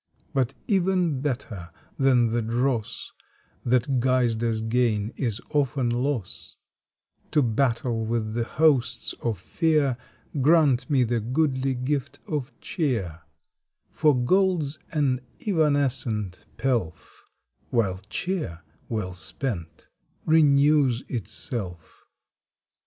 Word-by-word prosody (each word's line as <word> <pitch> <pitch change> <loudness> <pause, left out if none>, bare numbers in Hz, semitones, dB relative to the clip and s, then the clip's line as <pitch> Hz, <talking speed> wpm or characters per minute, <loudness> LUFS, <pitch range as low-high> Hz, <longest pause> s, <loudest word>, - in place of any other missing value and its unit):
But 135 -2 0
even 180 -7 +2
better 120 - -3 0.3
than 125 -4 +4
the 120 +1 +1
dross 115 0 -1 0.5
That 125 +2 +2
guised 120 -3 +2
as 115 -2 0
gain 115 -2 +1
is 115 -5 -2
often 135 -4 +1
loss, 125 -4 -3 0.7
To 150 - +3
battle 120 -1 +1
with 110 -1 -1
the 120 0 0
hosts 145 -3 +2
of 115 -4 -1
fear 150 - +1 0.4
Grant 150 -2 +4
me 135 -4 +4
the 120 0 0
goodly 130 +2 0
gift 135 +2 -2
of 145 -4 -3
cheer, 110 - -2 0.7
For 150 -5 +3
gold 185 +5 +3
s 145 +2 -5
an 140 -5 +1 0.2
evanescent 135 - 0
pelf, 115 -10 -2 0.4
While 100 -6 +1
cheer 95 - -3 0.3
well 105 -5 -2
spent 95 - -5 0.4
renews 145 -4 +4
itself. 105 - -6
125 Hz, 100 wpm, -25 LUFS, 115-145 Hz, 0.7 s, than